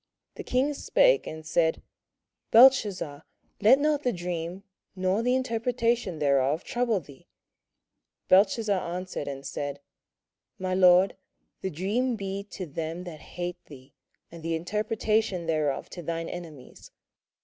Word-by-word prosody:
The - - -8
king 265 +4 +1
spake, - - +3
and 160 0 -7
said, 160 0 +1 0.7
Belteshazzar, 210 - +5 0.4
let 225 +6 +7
not 295 0 +1
the 250 - +1
dream, 175 0 -5 0.3
or 185 +3 +1
the 250 +2 +2
interpretation 235 -5 0
thereof, 140 +2 +2
trouble 240 -4 0
thee. 140 -5 -16 1.0
Belteshazzar 200 +1 +4 0.2
answered 185 -4 -5
and 140 -1 -6
said, 140 0 -4 0.8
My 185 0 -2
lord, 185 +1 +5 0.4
the 190 - -2
dream 210 - -1
be 195 -1 -4
to 190 -2 -7
them 165 +3 -5
that 170 -4 -9
hate 175 0 -6
thee, 135 -2 -14 0.4
and 170 0 -10
the 165 0 -1
interpretation 210 +1 -1
thereof 155 -4 -1
to 175 - -7
thine 165 0 -4
enemies. 160 -7 -10
185 Hz, 125 wpm, -27 LUFS, 160-225 Hz, 1.0 s, let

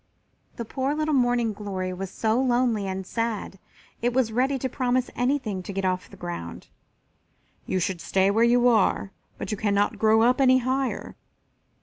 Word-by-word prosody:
The 235 - -5
poor 265 +5 -2
little 310 0 0
Morning 245 -4 +2
glory 190 -3 -4
was 190 +1 -5
so 220 +5 0
lonely 240 -5 +1
and 190 0 -4
sad 225 -3 -3 0.4
it 240 +1 +1
was 250 -3 +1
ready 260 +4 +1
to 260 - -2
promise 255 -1 -1
anything 245 -6 -1
to 185 - -7
get 195 0 -2
off 185 0 -1
the - - -14
ground. 170 - -7 1.0
"You 185 - 0
should 180 -1 -2
stay 195 +1 +2
where 225 +3 +3
you 240 +1 +4
are, 215 -4 +2 0.3
but - - -5
you 210 - -2
cannot 205 +1 0
grow 220 0 +4
up 250 +3 +3
any 260 -1 +6
higher. 260 +1 -2
225 Hz, 175 wpm, -25 LUFS, 195-255 Hz, 1.0 s, any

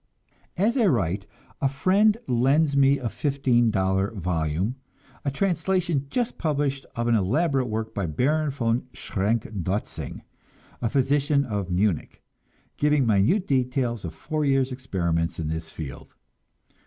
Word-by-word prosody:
As 215 +8 +2
I 230 -5 +4
write, 100 - 0 0.3
a 135 - +3
friend 195 +10 +3
lends 135 +4 +3
me 140 0 +5
a 130 -3 -3
fifteen 130 -3 +1
dollar 95 -1 +1
volume, 90 - -2 0.5
a 140 - 0
translation 170 -1 0
just 240 - -2
published 145 -3 -1
of 120 0 -1
an 120 - +3
elaborate 130 - +2
work 110 0 -3
by 100 -4 -2
Baron 150 - +1
von 125 -2 -1
Schrenck 105 +3 -1
Notzing, 95 +1 -4 0.6
a 115 - 0
physician 140 +2 +2
of 100 -6 -3
Munich, 90 -1 -1 0.5
giving 150 -2 +3
minute 115 - +3
details 125 - 0
of 80 -3 -6
four 155 - -2
years' 135 -2 +2
experiments 85 -10 -1
in 80 -2 -2
this 80 0 -4
field. 70 -6 -8
125 Hz, 135 wpm, -25 LUFS, 100-145 Hz, 0.6 s, me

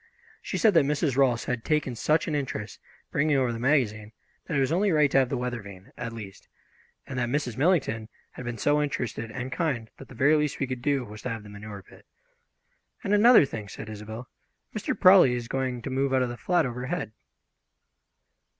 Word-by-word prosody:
She - - -4
said 220 -3 +4
that 165 -5 +5
Mrs. 145 -1 0
Rolfs 130 -4 +3
had 125 -2 -2
taken 150 -4 0
such 155 +7 +1
an 155 - -2
interest, 130 -8 -4 0.3
bringing 145 0 +2
over 125 -3 +1
the 115 - -5
magazine, 115 -6 +1 0.3
that 150 - -1
it - - +3
was 135 +1 +1
only 195 +4 +2
right 150 -3 +3
to - - +5
have 130 -2 +2
the - - -1
weather 120 -1 -3
vane, 95 -2 -12
at 120 -1 -5
least; 105 -4 -10 0.6
and 130 -2 -5
that 120 -1 0
Mrs. 125 -4 -1
Millington 130 -8 +1 0.2
had - - -9
been 120 -1 -4
so 145 +6 +2
interested 120 -5 -3
and 125 +3 -5
kind 135 -11 -2
that 135 - -11
the 130 - -13
very 140 +6 +4
least 150 -2 0
we 140 - +1
could 130 -1 -5
do 140 -2 0
was 105 0 -10
to - - -4
have 115 -2 -5
the 105 - -12
manure 100 -1 -9
pit. - - -19 1.0
"And 205 -2 0
another 220 - +7
thing," 110 -6 -7
said 110 +1 -8
Isobel, 110 +3 -8 0.5
"Mr. 215 - -2
Prawley 185 -9 +7
is 120 -1 -4
going 130 -2 -2
to 135 - -4
move 135 0 +1
out 130 - +3
of 125 - -2
the 120 - -5
flat 175 +6 +1
overhead." 125 - -3
130 Hz, 210 wpm, -27 LUFS, 115-150 Hz, 1.0 s, another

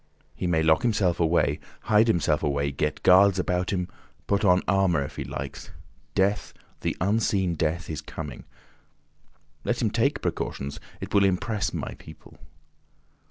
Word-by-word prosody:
He 90 - -3
may 80 -2 +2
lock 80 0 +4
himself 100 -7 +1
away, 85 0 +2 0.2
hide 110 +2 +4
himself 80 -7 +2
away, 70 0 0
get 70 - -2
guards 95 +1 +6
about 90 0 0
him, 90 -2 -1 0.4
put 100 +1 +1
on 90 -2 +4
armour 95 -7 +2
if 65 - -8
he - - -2
likes—Death, 75 +8 -4 0.2
the - - -2
unseen 95 -2 +1
Death, 80 +1 -1
is 80 - -4
coming. 75 -6 -8 1.2
Let - - -1
him - - +1
take - - +1
precautions; 70 +2 -3 0.2
it - - -6
will 100 - +5
impress 100 +2 0
my - - -4
people. 80 - -14
90 Hz, 145 wpm, -26 LUFS, 80-100 Hz, 1.2 s, guards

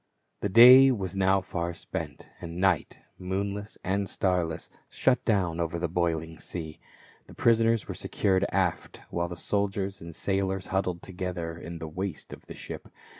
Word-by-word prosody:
The 100 - -1
day 125 +6 +9
was 100 -7 -2
now 95 0 +3
far 85 -2 -4
spent, - - -6
and 85 0 -7
night, 95 -4 +1 0.2
moonless 100 +3 -3
and 95 +1 -1
starless, 90 -4 -1 0.2
shut 130 -1 +1
down 90 -7 +1
over 85 0 -1
the 85 +1 -1
boiling 80 -2 -1
sea. 80 -3 -6 0.5
The - - -13
prisoners 115 -1 +3
were - - -4
secured 95 -1 0
aft, 95 -3 -1
while 85 0 -1
the 85 - -5
soldiers 100 +1 -2
and 85 -1 -9
sailors 95 -1 -1
huddled 90 -2 -1
together 90 -3 -4
in 85 +1 -8
the 80 -1 -6
waist 90 +3 -5
of - - -13
the - - -8
ship. - - -8
95 Hz, 160 wpm, -28 LUFS, 85-100 Hz, 0.5 s, day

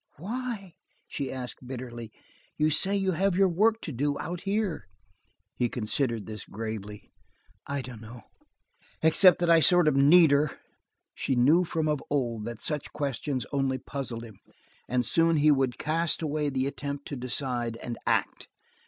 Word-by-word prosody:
"Why?" 210 - -5 0.3
she 140 -2 -4
asked 125 -1 -7
bitterly. 120 -3 -7 0.5
"You 155 +1 +2
say 195 +6 +3
you 190 -1 +1
have 185 +2 +1
your 195 +1 +4
work 215 +6 +2
to 155 - -5
do 145 +3 -1
out 175 +1 -5
here?" 195 - -1 0.7
He 120 - 0
considered 115 -1 -1
this 105 0 -7
gravely. 105 -1 -7 0.6
"I 140 -1 -2
dunno. 115 -2 -10 0.8
Except 175 +3 +6
that 175 -1 0
I 165 - +7
sort 175 +1 +5
of 150 - +3
need 150 +3 +6
her." 145 +1 +2 0.6
She 135 - -1
knew 145 +9 +5
from 160 -2 -1
of 150 -2 0
old 120 -6 -1
that 115 -1 -6
such 150 -3 -3
questions 140 -2 -2
only 135 -2 0
puzzled 130 -3 -6
him, 110 -4 -12 0.5
and 125 0 +1
soon 165 +5 +3
he 150 +1 +5
would 135 -3 +1
cast 165 +2 0
away 150 -1 -1
the 130 -1 -1
attempt 140 0 -5
to 145 - -4
decide, 125 -2 -3
and 120 0 -5
act. - - 0
140 Hz, 160 wpm, -28 LUFS, 120-165 Hz, 0.8 s, I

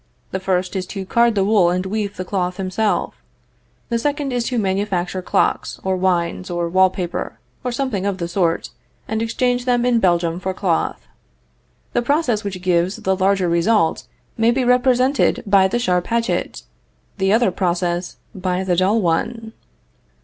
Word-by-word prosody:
The 190 - -2
first 185 0 -1
is 185 -1 -2
to 195 -1 -5
card 235 +3 +3
the 195 - +2
wool 200 -4 +4
and 180 +1 -1
weave 205 0 -3
the 185 - -4
cloth 180 -1 -2
himself; 195 +3 -1 0.8
the 235 -1 0
second 285 0 -1
is 240 -1 -1
to 250 - -2
manufacture 190 -3 -1
clocks, - - 0
or 190 0 0
wines, 180 -1 0
or 175 -1 -1
wall 185 +2 +4
paper, 180 -2 -4 0.3
or 250 - -2
something 240 -6 -2
of 200 -2 -1
the 170 -2 -3
sort, 170 -2 0 0.4
and 220 +1 -2
exchange 245 +2 0
them 245 -1 +2
in 245 -2 +3
Belgium 175 -3 +1
for 190 0 -3
cloth. 180 -4 -1 0.9
The 240 - +2
process 245 -5 +1
which 190 -3 -5
gives 180 +1 +1
the 190 0 0
larger 190 -1 +2
result 170 +2 +1 0.3
may 225 +1 +4
be 250 +1 +1
represented 250 +1 +3
by 195 -2 +4
the 215 - -1
sharp 180 -6 0
hatchet; 235 0 -1 0.6
the 190 0 +2
other 225 -2 +3
process 175 -1 -1 0.2
by 185 0 -2
the 180 -2 +1
dull 195 +5 +2
one. 220 +7 -1
190 Hz, 165 wpm, -20 LUFS, 180-230 Hz, 0.9 s, wool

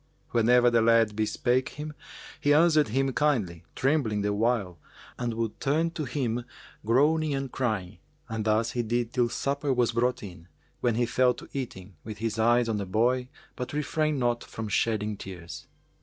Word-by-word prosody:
Whenever 120 +1 +4
the 120 -1 +4
lad 115 -2 +4
bespake 120 +4 0
him, 150 0 -5 0.5
he 145 0 +3
answered 155 -2 +5
him 135 +4 0
kindly, 110 - 0
trembling 130 -7 +1
the 105 0 0
while 100 -5 0 0.4
and 120 -2 -2
would 115 -2 -3
turn 160 +4 +1
to 160 -3 -4
him 120 -2 -2 0.4
groaning 150 +6 +2
and 135 -2 -3
crying, 110 -8 -2 0.3
and 110 -1 -3
thus 110 +2 +2
he 120 - -1
did 120 +1 -1
till 120 -2 +2
supper 140 +3 -1
was 125 -2 +2
brought 125 +1 0
in, 90 -4 -10 0.3
when 120 -2 +1
he 120 +1 +2
fell 125 +1 +2
to - - -11
eating, 100 - -6
with 110 -1 -7
his 110 0 -3
eyes 120 +1 +4
on 110 -2 0
the 100 - -3
boy 125 +6 +1 0.3
but 125 - -5
refrained 150 0 0
not 120 -1 0
from 110 -1 -6
shedding 105 0 0
tears. 85 -7 -9
120 Hz, 170 wpm, -27 LUFS, 110-135 Hz, 0.5 s, answered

